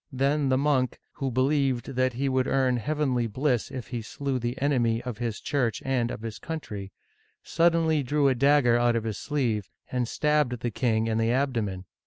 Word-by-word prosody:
Then 140 Hz, +2 st, +1 dB
the 130 Hz, -, +3 dB
monk 135 Hz, -3 st, +1 dB
— -, -, -48 dB
who 135 Hz, -, -1 dB
believed 130 Hz, 0 st, +1 dB
that 130 Hz, 0 st, +1 dB
he 135 Hz, +4 st, -1 dB
would 130 Hz, 0 st, +1 dB
earn 130 Hz, -2 st, +2 dB
heavenly 130 Hz, -2 st, 0 dB
bliss 125 Hz, +2 st, 0 dB
if 125 Hz, -1 st, -7 dB
he 120 Hz, -3 st, -3 dB
slew 135 Hz, +4 st, -3 dB
the 120 Hz, +1 st, -3 dB
enemy 120 Hz, -5 st, +2 dB
of 120 Hz, -4 st, -6 dB
his 115 Hz, -3 st, -3 dB
Church 125 Hz, -7 st, -1 dB
and 125 Hz, -3 st, +1 dB
of 110 Hz, -, -6 dB
his 115 Hz, -2 st, -6 dB
country 105 Hz, -, -6 dB, 0.3 s
— -, -, -40 dB
suddenly 165 Hz, -2 st, +2 dB
drew 145 Hz, +2 st, +2 dB
a 135 Hz, -, +4 dB
dagger 130 Hz, -2 st, +4 dB
out 120 Hz, -1 st, +3 dB
of 115 Hz, -, 0 dB
his 110 Hz, -3 st, -4 dB
sleeve, 120 Hz, -9 st, -1 dB, 0.2 s
and 125 Hz, -2 st, 0 dB
stabbed 150 Hz, -4 st, +1 dB
the 120 Hz, -, -1 dB
king 110 Hz, -1 st, +1 dB
in 115 Hz, 0 st, 0 dB
the 115 Hz, +1 st, +2 dB
abdomen. 115 Hz, -8 st, -1 dB
130 Hz, 200 wpm, -27 LUFS, 115-140 Hz, 0.3 s, a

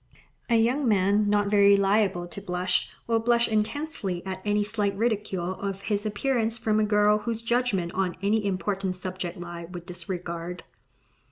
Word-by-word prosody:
A 235 Hz, -, +4 dB
young 245 Hz, +5 st, +2 dB
man, 205 Hz, 0 st, +3 dB
not 205 Hz, 0 st, +2 dB
very 200 Hz, -1 st, +6 dB
liable 195 Hz, -2 st, +2 dB
to 175 Hz, +3 st, -9 dB
blush, 180 Hz, -1 st, 0 dB, 0.2 s
will 230 Hz, -1 st, +2 dB
blush 235 Hz, +1 st, +3 dB
intensely 215 Hz, -, -2 dB
at 190 Hz, 0 st, -5 dB
any 210 Hz, 0 st, +1 dB
slight 205 Hz, -2 st, -1 dB
ridicule 205 Hz, -5 st, -1 dB
of 195 Hz, 0 st, -5 dB
his 205 Hz, +1 st, -1 dB
appearance 230 Hz, +1 st, 0 dB
from 215 Hz, -1 st, +1 dB
a -, -, +3 dB
girl 210 Hz, 0 st, +3 dB
whose 230 Hz, +1 st, -3 dB
judgment 230 Hz, -7 st, 0 dB
on 185 Hz, -2 st, -1 dB
any 210 Hz, +3 st, +1 dB
important 190 Hz, 0 st, -1 dB
subject 185 Hz, 0 st, -5 dB
he 175 Hz, -1 st, -7 dB
would 175 Hz, 0 st, -9 dB
disregard. 175 Hz, -1 st, -5 dB
200 Hz, 160 wpm, -26 LUFS, 185-220 Hz, 0.2 s, very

